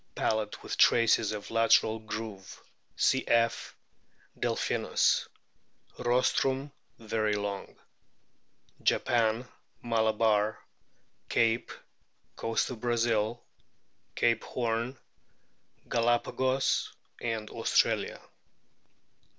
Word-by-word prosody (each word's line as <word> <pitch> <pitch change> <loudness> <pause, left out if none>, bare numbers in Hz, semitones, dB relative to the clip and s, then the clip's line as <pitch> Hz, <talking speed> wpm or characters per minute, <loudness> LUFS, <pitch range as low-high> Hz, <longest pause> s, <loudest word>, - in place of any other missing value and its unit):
Palate 110 -1 -1
with - - -4
traces 115 -2 +4
of 105 -1 -6
lateral 115 -1 +3
groove 110 -3 -7 0.4
(cf. 115 0 +1 0.7
Delphinus). - - +1 0.7
Rostrum 130 +3 +1 0.3
very 110 -1 -1
long. 100 -1 -4 1.1
Japan, 115 +1 +1 0.4
Malabar, 110 -2 +2 0.7
Cape, 115 0 +1 0.6
Coast 115 +3 -1
of 120 - -7
Brazil, 120 -1 0 0.7
Cape 115 -1 +2
Horn, 120 +2 -2 0.9
Galapagos, 120 +3 +1 0.3
Australia. 110 -2 0
115 Hz, 65 wpm, -29 LUFS, 110-120 Hz, 1.1 s, traces